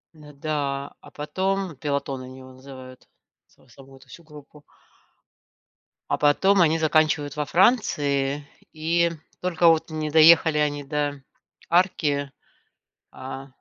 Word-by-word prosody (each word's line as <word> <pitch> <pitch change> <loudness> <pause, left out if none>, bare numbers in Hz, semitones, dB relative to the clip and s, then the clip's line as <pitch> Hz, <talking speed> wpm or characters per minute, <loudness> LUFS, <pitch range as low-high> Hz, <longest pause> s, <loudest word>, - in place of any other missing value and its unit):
Н, 150 -1 -15
да, 140 -2 -3
а - - -15
потом, 190 +3 -3
пелотон, 140 -1 -3
они 130 +1 -11
его 130 0 -13
называют 130 -1 -13 0.4
са - - -27
саму 135 +2 -17
эту 135 - -21
всю 170 - -14
группу. 150 -1 -15 1.5
А - - 0
потом, 190 +7 +3
они 165 -1 +3
заканчивают 155 -2 +1
во 150 0 -2
Франции. 145 - +1 0.3
И 170 +2 0 0.3
только 175 -1 +1
вот 165 0 +3
не 155 -1 -4
доехали 160 0 +6
они 145 -1 -1
до 145 -1 -3 0.5
арки, 150 -6 +1 0.8
а, 135 +1 -9
150 Hz, 125 wpm, -24 LUFS, 140-160 Hz, 1.5 s, доехали